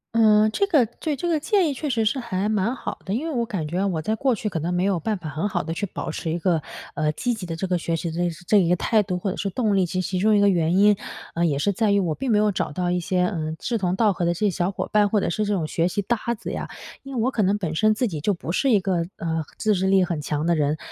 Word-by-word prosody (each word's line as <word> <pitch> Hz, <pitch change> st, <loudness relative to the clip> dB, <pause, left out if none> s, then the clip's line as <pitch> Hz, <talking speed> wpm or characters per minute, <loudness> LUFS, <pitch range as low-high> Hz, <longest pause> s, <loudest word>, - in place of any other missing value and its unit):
嗯， 215 Hz, -1 st, +5 dB
这 400 Hz, -, +1 dB
个 300 Hz, -, +4 dB
对， 285 Hz, +7 st, -4 dB
这 275 Hz, -, -5 dB
个 320 Hz, -2 st, +2 dB
建 380 Hz, +1 st, +2 dB
议 -, -, -1 dB
确 295 Hz, +2 st, -4 dB
实 230 Hz, -4 st, +1 dB
是 220 Hz, +5 st, +1 dB
还 210 Hz, -4 st, -2 dB
蛮 215 Hz, +3 st, 0 dB
好 -, -, -6 dB
的， 190 Hz, -, -2 dB
因 255 Hz, +9 st, -1 dB
为 325 Hz, -, -3 dB
我 235 Hz, -3 st, 0 dB
感 185 Hz, -8 st, -3 dB
觉 180 Hz, +6 st, -1 dB
我 175 Hz, -5 st, -1 dB
在 215 Hz, +8 st, -1 dB
过 250 Hz, +3 st, +1 dB
去 210 Hz, +1 st, -3 dB
可 165 Hz, -, -3 dB
能 170 Hz, +3 st, -2 dB
没 180 Hz, +1 st, +1 dB
有 195 Hz, -2 st, +1 dB
办 210 Hz, +6 st, -1 dB
法 165 Hz, -4 st, -7 dB
很 155 Hz, +7 st, -2 dB
好 185 Hz, -4 st, -2 dB
地 165 Hz, +1 st, -4 dB
去 185 Hz, -, -2 dB
保 175 Hz, -, -5 dB
持 160 Hz, -, -4 dB
一 165 Hz, -, -1 dB
个， 170 Hz, -2 st, +1 dB, 0.3 s
呃， 155 Hz, 0 st, 0 dB
积 245 Hz, +9 st, -1 dB
极 210 Hz, -5 st, -6 dB
的 165 Hz, -2 st, -4 dB
这 170 Hz, -, -3 dB
个 180 Hz, -1 st, 0 dB
学 165 Hz, 0 st, -2 dB
习 165 Hz, 0 st, -3 dB
的 160 Hz, -, -6 dB, 0.3 s
这 210 Hz, -, +4 dB
一 185 Hz, -4 st, +4 dB
个 175 Hz, -, +3 dB
态 215 Hz, +5 st, +2 dB
度， 185 Hz, -3 st, -2 dB
或 190 Hz, +2 st, -2 dB
者 -, -, -6 dB
是 200 Hz, -, -2 dB
动 215 Hz, 0 st, 0 dB
力， 190 Hz, -2 st, +3 dB
其 185 Hz, +2 st, -2 dB
实 180 Hz, -, -4 dB
其 185 Hz, -, -1 dB
中 215 Hz, +3 st, +4 dB
一 205 Hz, -, +4 dB
个 205 Hz, -, +5 dB
原 170 Hz, -2 st, +2 dB
因， 205 Hz, +1 st, +5 dB, 0.4 s
呃， 170 Hz, +1 st, +1 dB
也 145 Hz, -4 st, +1 dB
是 200 Hz, +8 st, +1 dB
在 205 Hz, +1 st, +1 dB
于 200 Hz, -, +4 dB
我 170 Hz, -4 st, 0 dB
并 265 Hz, -, -4 dB
没 215 Hz, -, +4 dB
有 210 Hz, 0 st, +3 dB
找 185 Hz, -, -2 dB
到 175 Hz, +2 st, -1 dB
一 180 Hz, -, +1 dB
些， 180 Hz, +1 st, 0 dB
呃， 160 Hz, -3 st, -1 dB
志 235 Hz, +6 st, -2 dB
同 185 Hz, -3 st, 0 dB
道 215 Hz, +1 st, +3 dB
合 175 Hz, -2 st, -2 dB
的 170 Hz, -, +2 dB
这 170 Hz, -, -8 dB
些 210 Hz, -, +3 dB
小 175 Hz, -1 st, -1 dB
伙 195 Hz, -, -4 dB
伴， 210 Hz, -1 st, +4 dB
或 205 Hz, 0 st, +1 dB
者 -, -, 0 dB
是 210 Hz, +5 st, -1 dB
这 205 Hz, -, 0 dB
种 175 Hz, -5 st, 0 dB
学 165 Hz, +2 st, 0 dB
习 195 Hz, +3 st, -1 dB
搭 235 Hz, +5 st, 0 dB, 0.2 s
子 -, -, -6 dB
呀。 -, -, -4 dB, 0.4 s
因 275 Hz, -1 st, -8 dB
为 235 Hz, -, 0 dB
我 255 Hz, -, +1 dB
可 230 Hz, -, 0 dB
能 200 Hz, +1 st, +2 dB
本 175 Hz, -6 st, -3 dB
身 215 Hz, +6 st, +3 dB
自 250 Hz, +4 st, 0 dB
己 160 Hz, -5 st, -4 dB
就 200 Hz, +8 st, +1 dB
不 170 Hz, -2 st, -5 dB
是 270 Hz, +9 st, +1 dB
一 210 Hz, -5 st, +4 dB
个， 180 Hz, -3 st, 0 dB
呃， 160 Hz, -1 st, -2 dB
自 215 Hz, -, +2 dB
制 190 Hz, -1 st, 0 dB
力 190 Hz, -1 st, +4 dB
很 170 Hz, -3 st, -2 dB
强 150 Hz, +1 st, -2 dB
的 170 Hz, 0 st, +3 dB
人， 150 Hz, 0 st, +1 dB
190 Hz, 345 characters per minute, -23 LUFS, 170-215 Hz, 0.4 s, 嗯